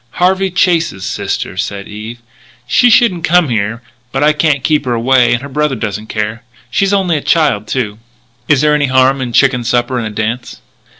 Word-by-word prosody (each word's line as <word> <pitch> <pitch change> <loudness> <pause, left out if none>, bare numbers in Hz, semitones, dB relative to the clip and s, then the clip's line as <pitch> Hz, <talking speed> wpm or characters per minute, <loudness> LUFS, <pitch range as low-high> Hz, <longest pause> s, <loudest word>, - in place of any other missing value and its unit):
"Harvey 190 +2 +1
Chase's 170 - 0
sister," - - -3
said 100 +2 -4
Eve. 110 +3 -8 0.5
"She 245 - +3
shouldn't 220 -8 +3
come 175 -2 +3
here, 115 +1 -2 0.3
but 135 +2 -1
I 150 +1 +4
can't 150 -3 0
keep 150 0 +1
her 120 -1 0
away 125 +1 +3
and 120 +2 0
her - - -6
brother 150 0 -1
doesn't 110 -1 -5
care. 110 +2 -3 0.3
She's 195 +6 +1
only 190 -5 +1
a - - -4
child, 140 -12 +1
too." 110 -5 -3 0.5
"Is 145 -3 +3
there 150 0 +3
any 145 -1 +1
harm 130 +1 +2
in 125 - -3
a - - -8
chicken 125 0 +2
supper 120 +1 0
and 115 - -3
a - - -5
dance?" 110 +3 -4
130 Hz, 195 wpm, -14 LUFS, 115-155 Hz, 0.5 s, I